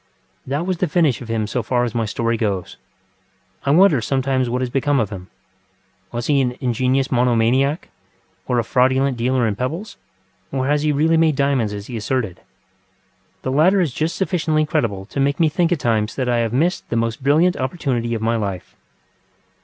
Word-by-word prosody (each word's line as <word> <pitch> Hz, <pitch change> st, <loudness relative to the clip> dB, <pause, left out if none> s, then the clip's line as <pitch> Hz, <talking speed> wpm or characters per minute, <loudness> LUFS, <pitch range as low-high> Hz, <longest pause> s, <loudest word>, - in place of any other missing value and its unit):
That 145 Hz, +6 st, -2 dB
was 185 Hz, -1 st, -1 dB
the 180 Hz, -, 0 dB
finish 150 Hz, -6 st, +1 dB
of 120 Hz, -, -8 dB
him 115 Hz, -1 st, -1 dB
so 120 Hz, +4 st, -2 dB
far 120 Hz, +2 st, 0 dB
as 120 Hz, -, -2 dB
my 115 Hz, -2 st, 0 dB
story 115 Hz, +2 st, -1 dB
goes. 100 Hz, -5 st, -2 dB, 0.9 s
I -, -, +3 dB
wonder 160 Hz, -3 st, +5 dB
sometimes 130 Hz, 0 st, 0 dB
what 125 Hz, +2 st, -1 dB
has 125 Hz, -, -3 dB
become 140 Hz, +1 st, +1 dB
of 110 Hz, -3 st, -1 dB
him. 95 Hz, -2 st, -8 dB, 0.8 s
Was 120 Hz, 0 st, -4 dB
he 145 Hz, -2 st, +3 dB
an 125 Hz, -1 st, -2 dB
ingenious 130 Hz, +1 st, 0 dB
monomaniac, 125 Hz, +4 st, +2 dB, 0.6 s
or 125 Hz, -, +1 dB
a 120 Hz, -, +2 dB
fraudulent 130 Hz, +3 st, +2 dB
dealer 125 Hz, +1 st, +1 dB
in 105 Hz, -2 st, 0 dB
pebbles, 165 Hz, -, -4 dB, 0.5 s
or 130 Hz, -1 st, -1 dB
has 145 Hz, +1 st, +1 dB
he 150 Hz, 0 st, +1 dB
really 160 Hz, +3 st, +2 dB
made 160 Hz, -2 st, +3 dB
diamonds 135 Hz, -6 st, +1 dB
as 100 Hz, -1 st, -6 dB
he 120 Hz, 0 st, -6 dB
asserted? 110 Hz, -4 st, -2 dB, 1.0 s
The 130 Hz, -, -2 dB
latter 170 Hz, +8 st, +4 dB
is 165 Hz, -8 st, 0 dB
just 160 Hz, +5 st, -1 dB
sufficiently 160 Hz, -5 st, 0 dB
credible 100 Hz, -9 st, -1 dB
to 125 Hz, -, -6 dB
make 140 Hz, +3 st, +1 dB
me 160 Hz, -2 st, +4 dB
think 170 Hz, +2 st, 0 dB
at 175 Hz, -, +1 dB
times 110 Hz, -3 st, 0 dB
that 130 Hz, -2 st, -2 dB
I 120 Hz, -1 st, +2 dB
have 115 Hz, -1 st, 0 dB
missed 165 Hz, +9 st, 0 dB
the -, -, -2 dB
most 115 Hz, +3 st, -1 dB
brilliant 155 Hz, +7 st, +3 dB
opportunity 130 Hz, -4 st, -2 dB
of 110 Hz, -, -4 dB
my 115 Hz, +1 st, +1 dB
life. 100 Hz, -5 st, -5 dB
130 Hz, 195 wpm, -20 LUFS, 115-150 Hz, 1.0 s, wonder